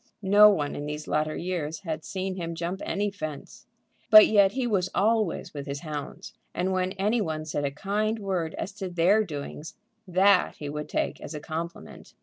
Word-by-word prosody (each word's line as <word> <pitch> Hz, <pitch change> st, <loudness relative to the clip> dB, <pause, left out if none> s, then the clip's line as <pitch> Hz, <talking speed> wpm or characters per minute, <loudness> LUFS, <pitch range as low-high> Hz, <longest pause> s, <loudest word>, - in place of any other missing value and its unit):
No 205 Hz, +2 st, +7 dB
one 150 Hz, -8 st, 0 dB
in 145 Hz, -, -5 dB
these 150 Hz, +1 st, -5 dB
latter 155 Hz, 0 st, 0 dB
years 165 Hz, -3 st, -3 dB
had 160 Hz, -4 st, -4 dB
seen 190 Hz, 0 st, -3 dB
him 170 Hz, -2 st, -4 dB
jump 170 Hz, +3 st, -4 dB
any 205 Hz, +1 st, -1 dB
fence. 155 Hz, -7 st, -8 dB, 0.4 s
But 215 Hz, -1 st, +10 dB
yet 200 Hz, -2 st, +4 dB
he 260 Hz, -1 st, -1 dB
was 190 Hz, -6 st, 0 dB
always 215 Hz, -3 st, +1 dB
with 140 Hz, -1 st, -6 dB
his 140 Hz, 0 st, -4 dB
hounds, 150 Hz, -3 st, -7 dB, 0.2 s
and 185 Hz, +2 st, 0 dB
when 185 Hz, 0 st, 0 dB
any 210 Hz, +4 st, +1 dB
one 155 Hz, -4 st, -3 dB
said 145 Hz, -2 st, -2 dB
a -, -, +1 dB
kind 210 Hz, +9 st, -1 dB
word 185 Hz, -6 st, -2 dB
as 200 Hz, -, -4 dB
to 190 Hz, -3 st, -4 dB
their 180 Hz, +5 st, +3 dB
doings, 150 Hz, -2 st, -7 dB, 0.3 s
that 185 Hz, +1 st, +4 dB
he 145 Hz, -, -6 dB
would 150 Hz, +1 st, -5 dB
take -, -, -2 dB
as 155 Hz, -, -7 dB
a -, -, -4 dB
compliment. 165 Hz, +3 st, -7 dB
180 Hz, 190 wpm, -27 LUFS, 155-200 Hz, 0.4 s, But